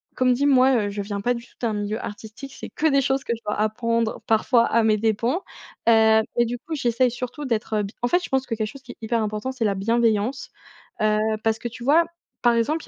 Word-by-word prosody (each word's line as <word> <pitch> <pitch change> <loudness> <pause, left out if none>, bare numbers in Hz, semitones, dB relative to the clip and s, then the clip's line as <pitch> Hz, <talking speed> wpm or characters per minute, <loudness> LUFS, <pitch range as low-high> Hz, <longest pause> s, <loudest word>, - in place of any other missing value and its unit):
comme 255 -1 +3
dit, 270 +3 0
moi 265 -1 +5
heu, - - -3
je 205 0 -4
viens 200 0 -4
pas 245 +4 +1
du 235 -1 -7
tout - - -26
d'un 230 -3 0
milieu 210 +1 -3
artistique, 220 +6 -8
c'est - - -8
que 315 - -4
des 275 -2 +3
choses 270 +1 0
que - - -1
je 230 - -14
dois 210 - -1
apprendre 230 +1 0
parfois 230 +2 +3
à 230 0 +2
mes 215 -1 +3
dépens. 225 - 0 0.5
Heu 220 -1 +6 0.2
et 240 - +4
du 240 +1 -4
coup 315 +6 -6
j'essaye 250 -2 +2
surtout 250 +4 -6
d'être, 225 -4 -2
heu, 210 - +1
bi 200 +2 -7
en - - +3
fait 355 +8 +2
je - - -6
pense 265 0 0
que 240 - -4
quelque 215 -1 -2
chose 265 +5 -11
qui 245 - -10
est - - -33
hyper 225 0 0
important, 215 +4 -3
c'est 255 -3 -2
la 205 - +2
bienveillance. 230 +4 0 0.5
Heu, 215 0 +3 0.3
parce 225 0 +1
que, - - -4
tu 235 +1 -9
vois, 310 +6 +4 0.4
par 240 -1 +5
exemple 270 +8 0
il - - -20
230 Hz, 255 wpm, -23 LUFS, 215-255 Hz, 0.5 s, Heu